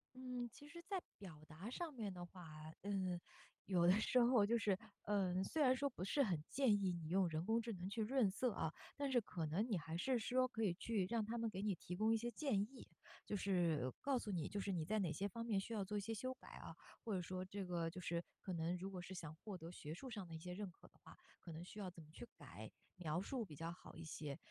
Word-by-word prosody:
嗯， 250 -1 -3
其 290 +5 -12
实 340 +3 -8
在 380 +1 -1 0.2
表 165 -7 -9
达 165 +8 -6
上 320 +5 -3
面 215 -6 -2
的 175 -1 -5
话， 180 +1 -10 0.4
嗯， 190 -3 0 0.5
有 175 -3 +4
的 180 - +9
时 250 - +5
候 240 -3 +7
就 235 +3 +4
是 205 -4 +3 0.3
呃， 190 -3 +2
虽 310 +10 0
然 255 -2 +7
说 280 +2 +2
不 240 - -5
是 240 +9 +3
很 180 - +2
建 265 -5 +5
议 190 -2 +3
你 170 -3 -3
用 185 +1 +4
人 160 +1 -1
工 225 +2 +4
智 230 +1 -3
能 185 0 -3
去 220 +3 -1
润 230 -1 +4
色 240 +6 +1
啊， 160 -5 -1 0.2
但 285 -1 +1
是 250 -2 +5
可 170 -6 -2
能 165 +8 +2
你 210 - +3
还 160 0 -3
是 250 +7 +3
说 255 +3 +3
可 225 -2 -1
以 195 -5 +4
去 205 +1 +1
让 230 -2 +2
它 225 +3 -2
们 230 -1 +1
给 190 -2 -3
你 205 -1 +2
提 180 - -5
供 215 +4 +4
一 - - +5
些 235 +2 -1
建 255 -4 +1
议， 230 +5 -5 0.4
就 205 - 0
是 170 -9 +3
告 275 -2 +3
诉 210 - -3
你， 170 -5 0
就 205 - -1
是 200 0 0
你 170 -3 +1
在 215 +7 +1
哪 175 -6 +2
些 200 +6 0
方 230 +4 -4
面 220 -4 +2
需 210 +4 -4
要 210 -3 +1
做 210 +2 -1
一 - - +1
些 225 +3 -2
修 255 +4 -1
改 260 - -16
啊， - - -7 0.3
或 220 - 0
者 185 - +1
说 185 +1 -3
这 195 +1 -3
个 170 -2 0
就 180 +2 -6
是 170 0 0 0.2
可 190 - -4
能 170 0 +1
如 190 +2 -4
果 185 -2 -4
是 180 +2 -6
想 165 -4 -5
获 195 +3 -6
得 165 0 -7
学 155 -3 -5
术 260 +10 -6
上 205 -6 -4
的 165 - -6
一 - - -5
些 180 +2 -5
认 200 +1 -3
可 - - -17
的 - - -27
话， - - -13 0.2
可 170 - -8
能 160 +2 -5
需 195 +4 -8
要 195 -3 -2
怎 170 -2 -11
么 150 - -16
去 235 - -8
改、 - - -8 0.3
描 170 -1 0
述 240 +3 -1
比 155 -6 -9
较 165 +3 -3
好 175 - -11
一 165 - -6
些。 150 -3 -4
195 Hz, 290 characters per minute, -42 LUFS, 175-230 Hz, 0.5 s, 的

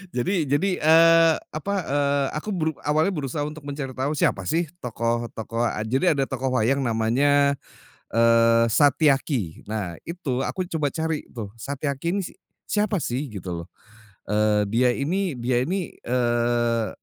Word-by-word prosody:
Jadi 170 +8 +1
jadi, 145 +8 +2
eee, 165 +1 +6 0.2
apa, 155 +6 -3
eee, 140 0 +1
aku 155 +8 -4
beru 165 -6 0
awalnya 155 +6 +1
berusaha 145 -2 -3
untuk 150 +1 -7
mencari 140 -2 -5
tahu 130 +3 -2
siapa 100 - +1
sih 170 +2 +1 0.2
tokoh-tokoh 115 -1 -2
eee, 105 - -3
jadi 130 +9 0
ada 135 - +2
tokoh 130 0 -2
wayang 135 +5 +2
namanya, 135 +5 +2 0.6
eee, 115 0 +5
Satyaki, 140 - +2
nah 100 -6 -4
itu 165 -7 -3
aku 185 - -2 0.2
coba 145 -2 +1
cari 160 -1 -2
tuh, 110 -5 -6
Satyaki 140 - -3
ini 200 - 0
si 185 - -7 0.4
siapa 205 -4 +1
sih 130 +5 -2
gitu 90 -6 -6
loh, - - -40 0.6
eee 105 0 +3
dia 125 +3 +3
ini 175 +5 -1
dia 120 +1 0
ini, 185 +1 -2 0.2
eee 120 -2 +1
135 Hz, 150 wpm, -24 LUFS, 115-155 Hz, 0.6 s, eee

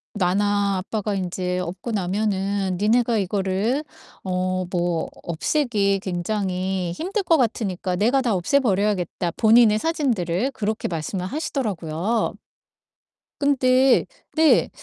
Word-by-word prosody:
나나 200 +1 +1
아빠가 210 +2 -3
인제 180 -1 -2
없고 180 +5 -5
나면은 195 -1 -1
너네가 230 +3 +2
이거를 200 +7 0 0.4
어 185 0 -1
뭐 175 -2 -1
없애기 200 - 0
굉장히 185 -1 -2
힘들 385 - -2
것 335 -2 +4
같으니까 200 - -1
내가 235 +8 +2
다 235 -6 +1
없애 185 +10 +2
버려야겠다." 195 - 0
본인의 220 -1 +5
사진들을 245 - 0
그렇게 215 +1 -2
말씀을 175 +3 -3
하시더라고요. 210 - -2 1.1
근데 265 -2 +4 0.3
네. 315 0 +4
200 Hz, 265 characters per minute, -23 LUFS, 185-235 Hz, 1.1 s, 본인의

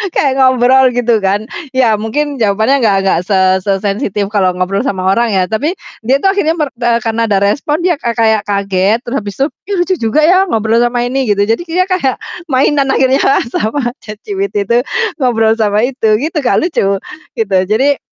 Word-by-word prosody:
kayak 275 -2 +1
ngobrol 260 0 +4
gitu 240 -2 +1
kan, 200 +3 0 0.3
iya 235 -5 +2
mungkin 280 +7 -3
jawabannya 220 +6 +2
enggak 200 -3 +3
enggak 180 -3 +2
se 195 -2 +1 0.3
sesensitif 200 +1 -1
kalau 190 -4 +1
ngobrol 195 +6 -2
sama 190 -3 -1
orang 235 -2 0
ya. 185 -1 +2
Tapi 290 +11 -1 0.3
dia 265 +3 +3
itu 390 - +2
akhirnya, 385 -5 +1
mer 300 -3 -1
eee, 235 -1 +1
karena 230 0 -1
ada 200 - +2
respon, 295 +10 0
dia 345 -4 +1
ka 235 -1 -1
kayak 220 -2 +2
kaget 200 +1 0
terus 240 +3 -5
habis 205 -1 -7
tuh, 280 +3 +1 0.2
"Ih 400 - 0
lucu 365 +2 +1
juga 230 +7 0
ya 370 +3 +4
ngobrol 225 +1 +1
sama 240 0 0
ini," 265 +1 -1
gitu. 200 0 +2
Jadi 225 +10 -1
dia 360 +2 0
kayak 275 -9 0 0.3
mainan 275 +1 +2
akhirnya 265 +1 +2 0.3
sama 240 +3 -1
ChatGPT 215 - -4
itu 235 - +3 0.4
ngobrol 225 -3 +2
sama 210 -1 +1
itu, 225 -5 +1
gitu 310 +1 -3
Kak, - - +2
lucu 200 - 0 0.4
gitu. 200 -4 0
Jadi 265 +8 +1
235 Hz, 185 wpm, -13 LUFS, 205-275 Hz, 0.4 s, ngobrol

